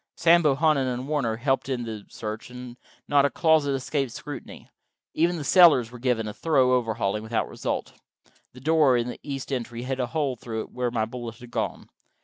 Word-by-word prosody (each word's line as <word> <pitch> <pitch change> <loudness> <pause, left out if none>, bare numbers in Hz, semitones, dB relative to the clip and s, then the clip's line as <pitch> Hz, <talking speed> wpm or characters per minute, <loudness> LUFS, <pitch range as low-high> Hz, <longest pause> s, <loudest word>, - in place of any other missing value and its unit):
Sam 170 +1 +5
Bohannon 150 -2 +2
and 125 +2 -4
Warner 140 -7 0
helped 135 +2 0
in 125 -2 -1
the 110 -3 -7
search, 110 +1 -6
and 125 -1 -9 0.3
not 145 -1 +4
a 140 - +3
closet 155 0 +2
escaped 135 -1 -2
scrutiny. - - -9 0.5
Even 170 +2 +1
the 155 - -4
cellars 145 -8 +6
were 125 - -10
given 120 -3 0
a 105 - -5
thorough 135 -4 +2
overhauling, 110 -4 0
without 110 +1 -1
result. - - -4 0.6
The 125 - -13
door 150 -3 +4
in 120 +1 -1
the - - -7
east 140 -1 -5
entry 120 -1 -4
had 130 +1 -3
a 125 - 0
hole 140 -1 -1
through 110 -1 -5
it - - -10
where 125 -1 -1
my 115 -2 0
bullet 115 0 -7
had 120 0 -13
gone. - - -3
125 Hz, 195 wpm, -25 LUFS, 120-145 Hz, 0.6 s, cellars